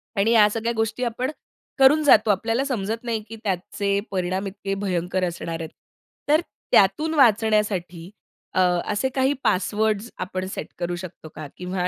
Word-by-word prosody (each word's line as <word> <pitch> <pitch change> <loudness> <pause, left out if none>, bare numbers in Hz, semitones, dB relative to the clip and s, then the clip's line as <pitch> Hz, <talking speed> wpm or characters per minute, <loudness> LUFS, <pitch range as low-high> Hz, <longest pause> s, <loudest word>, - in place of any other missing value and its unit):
आणि 205 +3 +2
या 215 -3 +6
सगळ्या 230 +2 -2
गोष्टी 225 +3 -1
आपण 250 +4 -2 0.5
करून 295 +3 +6
जातो. 220 -6 +5
आपल्याला 225 +6 0
समजत 225 -3 -3
नाही 230 -2 -2
की 225 - -7
त्याचे 200 +1 -1
परिणाम 185 +1 -1
इतके 195 0 -5
भयंकर 185 -2 -2
असणार 170 -1 -3
आहेत. 160 - -5 0.6
तर 310 +3 +5 0.3
त्यातून 255 +12 +4
वाचण्यासाठी 210 - +2 0.4
अ, - - +1 0.3
असे 235 +6 0
काही 265 +2 +2
पासवर्ड्स 215 +4 0
आपण 185 0 -4
सेट - - -5
करू 175 0 -2
शकतो 175 -3 -9
का? 155 -2 -7
किंवा 180 0 -2
205 Hz, 150 wpm, -23 LUFS, 185-230 Hz, 0.6 s, या